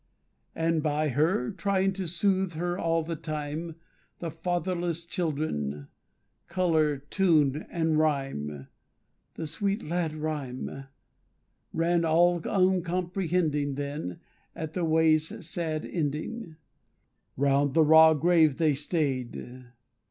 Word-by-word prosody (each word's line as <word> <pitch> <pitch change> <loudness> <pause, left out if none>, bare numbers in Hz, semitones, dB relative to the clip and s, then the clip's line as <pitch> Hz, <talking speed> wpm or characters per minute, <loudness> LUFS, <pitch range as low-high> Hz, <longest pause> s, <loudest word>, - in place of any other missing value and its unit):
And 165 -1 +1
by 150 0 0
her, 145 -1 +1
trying 195 0 0
to 190 -2 -4
soothe 185 +2 +1
her 175 +2 -2
all 165 -2 0
the 165 +1 -4
time, 155 +1 -5 0.4
The 165 -2 -5
fatherless 175 0 -2
children, 140 - -2 0.6
Colour, 160 -5 +2
Tune, 150 -1 +1
and 160 -2 +1
Rhyme 135 - -1 0.7
(The 160 - -4
sweet 200 +6 -1
lad 165 -1 -2
Rhyme), 140 -3 -4 0.9
ran 170 +1 +1
all 170 +2 +4
uncomprehending. 180 -5 0
Then, 140 - -4 0.4
at 160 -1 -5
the 180 -2 -1
way's 160 +4 +2
sad 160 -2 -3
ending, 160 +5 -3 0.8
Round 140 0 +2
the 160 - +6
raw 160 +1 +7
grave 160 -2 +4
they 155 -3 +3
stay'd. 130 -4 -3
160 Hz, 105 wpm, -28 LUFS, 145-175 Hz, 0.9 s, raw